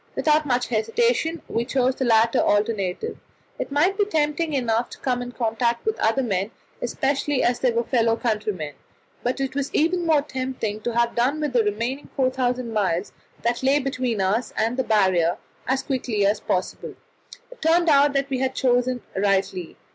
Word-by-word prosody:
Without 305 -1 +2
much 245 -1 0
hesitation 325 - 0
we 230 - -1
chose 260 +1 +1
the 260 - -2
latter 230 0 +4
alternative. 205 - 0 0.4
It - - -4
might 345 +9 +2
be 410 - +4
tempting 310 -3 0
enough 240 -3 0
to - - -10
come 250 -2 -1
in 245 0 -6
contact 235 0 -1
with 440 - -1
other 230 +5 +2
men, 195 -3 -1 0.3
especially 275 +3 0
as 240 0 +1
they 255 - +2
were 235 +1 0
fellow 230 -2 +2
countrymen, 210 - -2 0.5
but 250 +3 -1
it 270 -1 -2
was 280 0 -2
even 340 +2 +1
more 305 -3 +4
tempting 255 -6 -4
to 235 +1 -3
have 235 0 +2
done 260 +6 +1
with 300 -3 -2
the 240 -2 +4
remaining 230 +7 -2
4,000 255 -3 0
miles 195 -3 0 0.3
that 235 +1 0
lay 270 +2 +3
between 255 -6 -1
us 205 +6 0
and 225 +2 +1
the 260 - 0
Barrier 190 -7 +2 0.3
as 265 +1 0
quickly 245 -7 -1
as 205 +2 +2
possible. 185 - -3 0.6
It - - -14
turned 335 +2 +3
out 285 -1 +5
that 275 0 -1
we 260 - 0
had 265 0 -1
chosen 250 -1 +1
rightly. 195 -3 0
245 Hz, 180 wpm, -23 LUFS, 220-275 Hz, 0.6 s, out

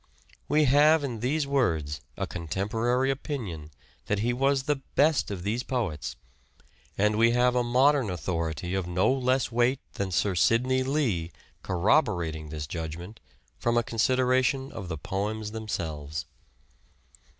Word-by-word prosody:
We 150 +1 +4
have 150 +3 +5
in 120 -5 -3
these 140 +6 0
words 80 - 0 0.2
a - - -1
contemporary 110 - -1
opinion 110 - -5 0.4
that 105 - +1
he 115 +4 0
was 135 +1 +1
the 145 +1 0 0.2
best 150 +1 +3
of 95 -4 -5
these 110 +5 -1
poets, 115 - -3 0.8
and 105 +1 +2
we 115 +1 +5
have 125 0 +3
a 125 -1 +2
modern 130 0 +3
authority 85 0 -3
of 95 -2 -1
no 90 +8 +2
less 130 -1 +1
weight 120 +3 +2
than 100 -1 -2
Sir 95 +2 +1
Sidney 125 +8 +2
Lee 125 - 0 0.3
corroborating 80 -3 +1
this 75 0 -5
judgment 85 +6 -6 0.4
from 120 0 +1
a 120 - +3
consideration 130 +3 +1
of 100 -5 -7
the 80 -2 -4
poems 105 +6 -3
themselves. 80 -8 -4
115 Hz, 140 wpm, -27 LUFS, 85-130 Hz, 0.8 s, have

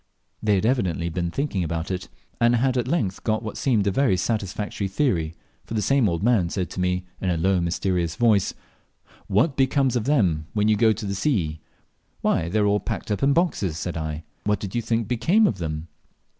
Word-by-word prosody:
They 105 -2 +3
had 95 - 0
evidently 90 -9 +1
been 85 +1 -2
thinking 120 - -1
about 80 +2 -3
it, 95 0 -4 0.3
and 120 0 +4
had 130 +2 +1
at 125 -1 0
length 115 - -1
got 110 0 0
what 110 - -5
seemed 115 -7 +1
a 100 - +2
very 100 -3 +2
satisfactory 105 -1 -2
theory; 95 - 0 0.3
for 115 - -6
the 110 - +1
same 135 -1 +3
old 85 +2 -2
man 110 -7 +3
said 90 -1 -3
to - - -6
me, 90 0 0 0.2
in 95 - 0
a 85 - +1
low, 95 +2 +2
mysterious 85 -1 -1
voice, 110 -5 +2 0.7
"What 115 - +2
becomes 135 -1 +2
of 115 -3 0
them 90 - +2
when 105 0 +2
you 110 - +4
go 110 +2 +3
on 110 - +2
to 110 - -6
the 100 - -2
sea?" 95 - 0 0.6
"Why, 80 - +1
they 105 - -1
are 105 - +3
all 105 0 +3
packed 105 - -4
up 105 - -1
in 140 +1 +4
boxes," 140 - 0
said 90 0 -4
I 80 -1 -4 0.2
"What 105 0 +1
did 100 -2 -6
you 120 - 0
think 115 -1 -1
became 170 - +3
of 100 - 0
them?" 80 -1 -4
100 Hz, 215 wpm, -24 LUFS, 90-120 Hz, 0.7 s, and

